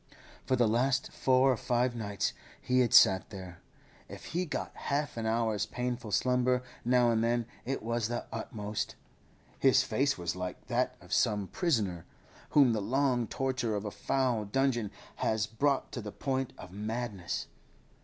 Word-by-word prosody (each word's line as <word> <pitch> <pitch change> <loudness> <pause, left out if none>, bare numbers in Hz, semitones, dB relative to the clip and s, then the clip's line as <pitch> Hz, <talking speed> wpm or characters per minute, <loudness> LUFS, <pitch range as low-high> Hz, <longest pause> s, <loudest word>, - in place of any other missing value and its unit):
For 130 - +3
the 120 -2 +3
last 130 +4 +1
four 130 +1 +3
or - - +2
five 120 +1 0
nights 105 -3 -2 0.3
he 125 0 +1
had 125 -3 +3
sat 95 -1 +6
there; 90 -4 -9 0.5
if - - -9
he 180 +2 -2
got - - -4
half 145 +1 -2
an 115 -1 -2
hour's 110 -2 +1
painful 125 -1 -3
slumber 125 +2 +2 0.2
now 125 0 +4
and 115 -1 +2
then 120 0 +1 0.2
it 135 -1 -2
was 115 -1 0
the 120 +1 -3
utmost. 105 -2 -4 0.6
His 130 -1 +5
face 135 +1 +1
was 85 -1 -3
like 90 0 -5
that - - +1
of - - -7
some 105 -2 +2
prisoner, 105 - 0 0.4
whom 135 -5 +5
the 110 - 0
long 125 +1 +1
torture 130 -4 -1
of 105 +1 -3
a 105 - -3
foul 125 -4 0
dungeon 120 -1 +1 0.3
has 110 -2 +1
brought 135 +5 0
to 120 - -4
the 105 -1 -6
point 130 +1 -2
of 90 - -10
madness. 105 -2 -3
120 Hz, 165 wpm, -31 LUFS, 105-130 Hz, 0.6 s, sat